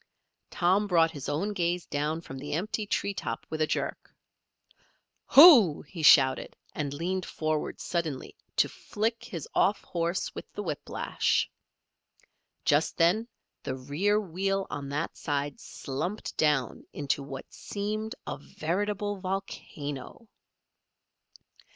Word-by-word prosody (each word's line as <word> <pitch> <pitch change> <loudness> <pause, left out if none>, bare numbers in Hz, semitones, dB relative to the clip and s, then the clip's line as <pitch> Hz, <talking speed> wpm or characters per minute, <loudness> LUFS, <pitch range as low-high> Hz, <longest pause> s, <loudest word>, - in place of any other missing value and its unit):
Tom 190 +3 +2
brought 165 -3 +4
his 145 -3 -6
own 170 +9 -1
gaze 175 -2 0
down 150 +3 -2
from 135 -5 -8
the 145 +2 -5
empty 210 +5 -2
tree 200 0 0
top 180 - -4
with 155 0 -2
a 155 - +3
jerk. - - -3 1.2
"Hoo!" 265 - +9
he 165 +3 -8
shouted, 135 -3 +6 0.2
and 145 -2 -2
leaned 180 +6 -2
forward 155 -2 -2
suddenly 160 -6 -3 0.2
to - - +4
flick 225 +2 -3
his 165 -5 -6
off 200 - +2
horse 170 +1 -2
with - - -9
the 205 - -4
whiplash. 155 -6 -1 1.1
Just 145 +3 +2
then 180 +7 +3 0.3
the 130 -2 -3
rear 150 +11 +1
wheel 195 +1 -1
on 140 -1 -4
that 150 +4 -2
side 145 -2 -2
slumped 175 +10 -5
down 150 -6 +1
into 145 -1 -1
what 135 -1 -8
seemed 215 +3 -4
a - - -4
veritable 205 +7 -2
volcano. 185 - -5
170 Hz, 125 wpm, -29 LUFS, 145-200 Hz, 1.2 s, Hoo